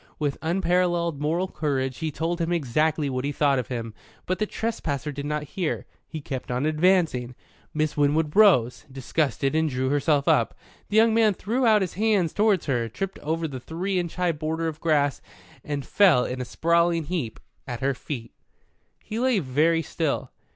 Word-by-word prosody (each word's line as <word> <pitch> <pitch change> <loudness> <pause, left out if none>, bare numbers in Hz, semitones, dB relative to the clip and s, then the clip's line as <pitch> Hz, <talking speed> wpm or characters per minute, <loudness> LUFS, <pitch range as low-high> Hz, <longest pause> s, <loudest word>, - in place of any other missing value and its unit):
With 145 -2 -2
unparalleled 175 -2 +1
moral 165 +5 0
courage 135 -6 -2
he 160 - -1
told 165 +3 -2
him 165 +1 -1
exactly 155 0 +1
what 130 -1 -2
he 145 - -1
thought 140 -2 +2
of 125 - -4
him. 115 -4 -5 0.3
But 185 - -2
the 215 - 0
trespasser 155 - -3
did 145 +1 -5
not 150 0 -2
hear. 180 -5 -2 0.2
He 155 - -6
kept 130 -2 -6
on 125 +3 -1
advancing. 155 -6 +2 0.4
Miss 155 0 -1
Winwood 150 +1 +1
rose, 170 - +4
disgusted, 135 +1 -1
and 160 0 +2
drew 130 0 -1
herself 145 0 +1
up. - - +3 0.3
The 210 - +1
young 225 0 +5
man 220 -3 +4
threw 235 +7 0
out 215 -2 +5
his 180 - -4
hands 205 -4 +1
towards 210 -4 +2
her, 120 -5 0
tripped 195 - -5
over 160 +2 -2
the 135 -4 -6
three 180 +8 -2
inch 170 -2 -4
high 180 -1 +1
border 160 +1 -2
of 160 -1 -5
grass, 145 -4 +1 0.4
and 145 -2 -4
fell 175 -12 +4
in 125 0 -4
a - - -3
sprawling 170 +3 +2
heap 150 -8 -4 0.3
at 120 -3 -5
her 135 +1 +1
feet. 120 -3 -7 0.7
He 220 - -4
lay 255 -2 +2
very 165 +2 +2
still. 155 -3 -2
155 Hz, 180 wpm, -25 LUFS, 140-175 Hz, 0.7 s, young